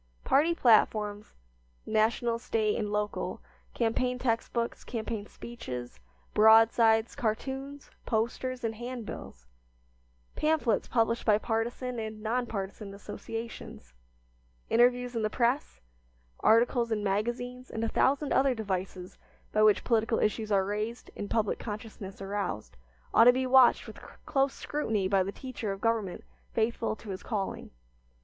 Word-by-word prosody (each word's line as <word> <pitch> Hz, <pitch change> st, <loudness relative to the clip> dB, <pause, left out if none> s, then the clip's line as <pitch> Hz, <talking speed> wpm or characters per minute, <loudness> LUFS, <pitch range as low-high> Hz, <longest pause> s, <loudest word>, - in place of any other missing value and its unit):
Party 315 Hz, +5 st, +3 dB
platforms, 215 Hz, -5 st, +2 dB, 0.5 s
national, 230 Hz, +2 st, +1 dB
State, 220 Hz, -3 st, 0 dB
and 210 Hz, -2 st, -2 dB
local, 210 Hz, 0 st, -2 dB, 0.4 s
campaign 250 Hz, +2 st, 0 dB
text 235 Hz, -2 st, -1 dB
books, 235 Hz, -1 st, -2 dB
campaign 220 Hz, -3 st, -4 dB
speeches; 125 Hz, -, -8 dB, 0.3 s
broadsides, 225 Hz, +1 st, +5 dB
cartoons, 270 Hz, +5 st, -4 dB, 0.2 s
posters, 240 Hz, +3 st, -1 dB
and 225 Hz, -1 st, -1 dB
handbills; 230 Hz, -, -7 dB, 0.9 s
pamphlets 305 Hz, -8 st, +1 dB
published 230 Hz, 0 st, +1 dB
by 210 Hz, -2 st, +4 dB
partisan 235 Hz, +3 st, -2 dB
and 220 Hz, -1 st, -5 dB
non 240 Hz, +2 st, 0 dB
partisan 200 Hz, -1 st, -5 dB
associations; 225 Hz, -, -8 dB, 0.8 s
interviews 245 Hz, +1 st, +3 dB
in 230 Hz, -, 0 dB
the 215 Hz, -, +1 dB
press; 245 Hz, +5 st, 0 dB, 0.6 s
articles 235 Hz, +1 st, +3 dB
in 210 Hz, -2 st, 0 dB
magazines, 240 Hz, +5 st, -2 dB
and 225 Hz, -, -4 dB
a -, -, +1 dB
thousand 280 Hz, +5 st, +1 dB
other 265 Hz, -1 st, +3 dB
devices 190 Hz, -3 st, -4 dB, 0.3 s
by 215 Hz, -, +3 dB
which 215 Hz, -2 st, +5 dB
political 225 Hz, -1 st, +2 dB
issues 215 Hz, 0 st, 0 dB
are 195 Hz, -1 st, +3 dB
raised 210 Hz, +4 st, -4 dB
and 205 Hz, -, -5 dB
public 220 Hz, -3 st, 0 dB
consciousness 210 Hz, -3 st, -7 dB
aroused, 195 Hz, -, -4 dB, 0.4 s
ought 230 Hz, -, +7 dB
to 245 Hz, -, +10 dB
be 260 Hz, +1 st, 0 dB
watched 255 Hz, -1 st, +5 dB
with -, -, -10 dB, 0.3 s
close 270 Hz, 0 st, +1 dB
scrutiny 220 Hz, -10 st, -1 dB
by 195 Hz, 0 st, +3 dB
the 190 Hz, +1 st, -2 dB
teacher 245 Hz, -4 st, -5 dB
of 195 Hz, -, -5 dB
government 220 Hz, -4 st, -1 dB, 0.3 s
faithful 225 Hz, 0 st, 0 dB
to 215 Hz, -2 st, -9 dB
his 185 Hz, -, -6 dB
calling. 205 Hz, -5 st, -4 dB
225 Hz, 130 wpm, -29 LUFS, 210-245 Hz, 0.9 s, to